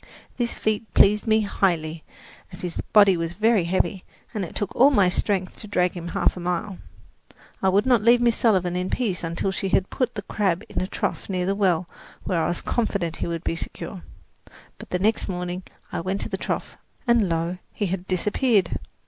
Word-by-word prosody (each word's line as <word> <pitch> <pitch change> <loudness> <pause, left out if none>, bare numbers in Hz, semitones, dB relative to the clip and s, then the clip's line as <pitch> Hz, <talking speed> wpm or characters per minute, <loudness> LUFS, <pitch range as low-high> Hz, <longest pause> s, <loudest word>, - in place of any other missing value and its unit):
This 240 -1 -1
feat 215 0 -2
pleased 210 +3 +5
me 220 0 +4
highly, 165 -6 0 0.5
as 180 - -10
his 175 -2 -4
body 200 -3 +7
was 165 0 -3
very 215 -1 +3
heavy, 185 +1 0 0.3
and 210 -4 -2
it 170 - -7
took 205 - -3
all 265 +4 +7
my 205 -10 +4
strength 185 0 -1
to 215 - -9
drag 180 -3 +2
him 175 -1 -6
half - - +1
a - - -6
mile. 180 +2 -3 0.8
I 190 - +3
would 200 +4 +3
not 245 -4 +4
leave 235 +3 +5
Miss 240 -2 +3
Sullivan 185 -6 +2
in 180 +1 -1
peace 200 -9 -1
until 170 +3 -1
she 190 0 -2
had 190 0 +1
put 255 -3 -1
the 205 - -4
crab 195 -2 0
in - - -2
a 185 - -1
trough - - -3
near 180 -2 -1
the 195 - +1
well 185 -4 +1 0.4
where 170 -3 0
I - - +1
was 175 - -2
confident 200 -8 -1
he - - -3
would 170 -1 -3
be - - -1
secure. 180 +2 -7 0.8
But 180 - -3
next 215 +3 +1
morning 180 0 -3 0.3
I - - -2
went 190 +3 -2
to - - -4
the - - -2
trough, - - -4 0.3
and 235 -6 +3
lo, 170 +2 -1
he 205 - -2
had 185 0 -3
disappeared! 200 +1 +1
190 Hz, 200 wpm, -24 LUFS, 175-210 Hz, 0.8 s, body